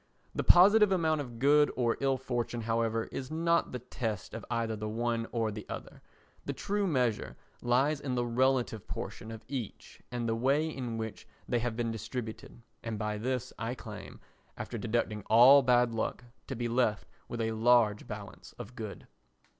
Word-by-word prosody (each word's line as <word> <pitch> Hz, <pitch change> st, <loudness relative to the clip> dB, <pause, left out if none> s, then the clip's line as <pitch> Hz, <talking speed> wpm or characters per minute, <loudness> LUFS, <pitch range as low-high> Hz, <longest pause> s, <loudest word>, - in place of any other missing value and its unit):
The -, -, -1 dB
positive 205 Hz, +3 st, +7 dB
amount 160 Hz, -5 st, +2 dB
of 120 Hz, -4 st, -8 dB
good 145 Hz, +4 st, +5 dB
or 120 Hz, -2 st, +1 dB
ill 135 Hz, -1 st, +1 dB
fortune, 120 Hz, -2 st, -3 dB
however, 115 Hz, 0 st, 0 dB
is 130 Hz, -1 st, -5 dB
not 170 Hz, +1 st, +1 dB
the 125 Hz, -, -3 dB
test 115 Hz, -4 st, -4 dB
of -, -, -6 dB
either 115 Hz, -2 st, -1 dB
the 105 Hz, 0 st, -4 dB
one 115 Hz, +1 st, -1 dB
or 115 Hz, -2 st, 0 dB
the 105 Hz, 0 st, -6 dB
other; -, -, -7 dB, 0.4 s
the -, -, -3 dB
true 205 Hz, 0 st, -1 dB
measure 125 Hz, -, 0 dB, 0.2 s
lies 135 Hz, +5 st, +2 dB
in 130 Hz, -3 st, -2 dB
the 120 Hz, -1 st, 0 dB
relative 125 Hz, -2 st, +1 dB
proportion 110 Hz, -, -6 dB
of 110 Hz, 0 st, -9 dB
each 125 Hz, -7 st, -6 dB
and 120 Hz, -1 st, -2 dB
the 115 Hz, -, +1 dB
way 135 Hz, +7 st, +2 dB
in 125 Hz, -7 st, -4 dB
which 110 Hz, -1 st, -6 dB, 0.2 s
they 120 Hz, -, +1 dB
have 120 Hz, -1 st, -2 dB
been 115 Hz, -1 st, -1 dB
distributed, 115 Hz, 0 st, -6 dB, 0.2 s
and 115 Hz, -2 st, -4 dB
by 105 Hz, 0 st, -2 dB
this 125 Hz, +2 st, -2 dB
I 115 Hz, +3 st, -2 dB
claim, 105 Hz, -5 st, -9 dB, 0.4 s
after -, -, -5 dB
deducting 110 Hz, -1 st, -1 dB
all 125 Hz, +6 st, +8 dB
bad 125 Hz, -2 st, +3 dB
luck, 115 Hz, +2 st, -2 dB, 0.2 s
to 135 Hz, -, -4 dB
be 120 Hz, 0 st, -2 dB
left 115 Hz, -3 st, +1 dB, 0.2 s
with 120 Hz, -, -5 dB
a 115 Hz, 0 st, 0 dB
large 110 Hz, -2 st, +3 dB
balance -, -, -9 dB
of 110 Hz, -, -8 dB
good. 110 Hz, -4 st, -7 dB
120 Hz, 180 wpm, -31 LUFS, 115-130 Hz, 0.4 s, all